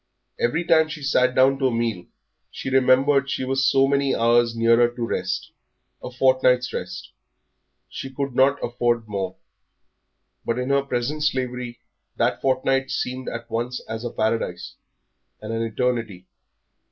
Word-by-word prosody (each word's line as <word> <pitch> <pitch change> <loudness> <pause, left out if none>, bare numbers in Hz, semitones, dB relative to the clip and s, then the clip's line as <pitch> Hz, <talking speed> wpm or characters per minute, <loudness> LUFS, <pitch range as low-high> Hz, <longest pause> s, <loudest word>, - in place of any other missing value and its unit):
Every 140 +9 +1
time 160 -2 +4
she 150 -1 -7
sat 130 -2 +2
down 135 +1 +4
to 135 - +2
a - - 0
meal 115 -6 -2 0.4
she 135 - -6
remembered 135 +2 +3
she 130 - -2
was 135 +1 +2
so 135 0 +4
many 140 0 +1
hours 115 0 +3
nearer 115 +1 +4
to 120 -1 -4
rest 95 -4 -3 0.5
a - - -6
fortnight's 125 -1 +2
rest - - -6 0.8
she 135 - -7
could 135 0 -4
not 135 +3 +4
afford 120 -1 0
more; 95 -3 -3 1.1
but 115 - -2
in 125 +1 -2
her 140 0 +3
present 140 +3 -2
slavery 125 -4 -2 0.3
that - - 0
fortnight 135 0 +1
seemed 130 +1 -3
at 115 0 -7
once 120 +2 -3
as 110 +1 -5
a 120 - -3
paradise 110 -6 -2 0.7
and 110 +1 -6
an 115 - -2
eternity. 115 -4 -2
125 Hz, 150 wpm, -23 LUFS, 115-135 Hz, 1.1 s, time